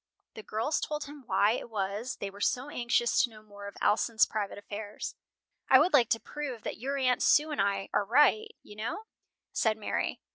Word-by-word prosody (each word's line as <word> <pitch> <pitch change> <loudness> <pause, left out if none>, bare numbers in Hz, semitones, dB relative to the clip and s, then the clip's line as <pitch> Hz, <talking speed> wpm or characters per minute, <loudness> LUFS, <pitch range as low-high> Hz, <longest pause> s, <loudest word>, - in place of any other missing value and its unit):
The 220 - -8
girls 225 +8 -1
told 300 -1 -3
him 290 -2 -11
why 205 +2 +3
it 240 - -4
was 210 +3 -3
they 195 - -5
were 200 +1 -12
so 260 +5 0
anxious 240 -1 +2
to 245 - +1
know 215 -1 -15
more 205 -1 -10
of 200 - -10
Alson's 220 +1 +3
private 205 -2 -4
affairs. 205 +1 -6 0.6
"I 260 - +9
would 310 +6 +3
like 245 -6 +5
to 225 - +2
prove 270 -6 -6
that - - -5
your 275 +4 -2
Aunt 255 -2 +2
Sue 305 +1 +4
and 295 - 0
I 195 -1 0
are - - +2
right, 295 - +4 0.2
you 210 - -13
know," 225 - -4 0.5
said 220 -1 +1
Mary. 215 - -2
225 Hz, 205 wpm, -30 LUFS, 205-275 Hz, 0.6 s, I